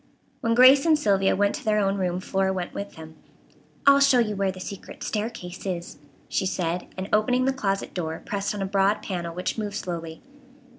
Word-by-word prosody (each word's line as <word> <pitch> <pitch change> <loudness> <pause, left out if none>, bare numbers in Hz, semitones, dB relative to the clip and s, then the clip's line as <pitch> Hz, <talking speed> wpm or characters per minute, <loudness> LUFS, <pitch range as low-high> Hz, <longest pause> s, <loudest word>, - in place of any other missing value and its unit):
When 230 -3 +1
Grace 265 +5 +7
and 315 -2 +5
Sylvia 195 -7 +2
went 205 +1 +2
to 295 - -6
their 215 -2 +2
own 195 -1 +2
room 180 -2 -1
Flora 190 0 0
went 185 -2 -4
with 200 0 -6
them. 160 0 -11 0.7
"I'll 280 0 +7
show 275 -2 +5
you 215 -3 +1
where 195 -1 0
that 185 - -11
secret 200 +1 -8
staircase 210 -5 -4
is," 175 -5 -5 0.3
she 190 - -1
said, 175 -1 -2
and 190 +1 -4
opening 250 +4 +3
the 270 - +2
closet 195 -7 -2
door 160 -3 -3
pressed 200 0 -2
on 200 - -2
a - - -1
broad 195 +1 +1
panel 170 -3 -4
which 180 +5 -3
moved 205 -1 -4
slowly. 165 -2 -5
195 Hz, 200 wpm, -25 LUFS, 180-215 Hz, 0.7 s, Grace